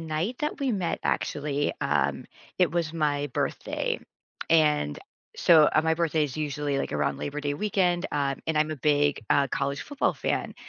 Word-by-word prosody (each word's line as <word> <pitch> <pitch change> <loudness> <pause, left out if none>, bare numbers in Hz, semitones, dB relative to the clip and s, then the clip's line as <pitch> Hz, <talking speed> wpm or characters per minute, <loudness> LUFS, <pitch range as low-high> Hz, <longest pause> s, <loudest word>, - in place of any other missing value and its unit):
night 165 +9 -2
that 300 0 -2
we 270 -3 0
met, 185 -5 -1
actually, 145 0 -1
um, 70 -1 0 0.3
it 180 -4 +4
was 165 -2 -1
my 145 -3 0
birthday. - - -2 0.5
And 150 - +3 0.4
so 160 -3 +6
uh, 155 - +3
my 160 0 +2
birthday 160 -2 +1
is 140 -1 -5
usually, 145 -2 -2
like, - - -3
around - - 0
Labor 145 +1 -4
Day 145 0 -2
weekend, 180 0 +1
um, 140 -2 0
and 160 - 0
I'm 155 0 +2
a 155 - -3
big, 145 +1 +2
uh, 140 -1 +4
college 140 +2 -2
football 290 -2 -1
fan, - - -2
150 Hz, 175 wpm, -27 LUFS, 145-165 Hz, 0.5 s, so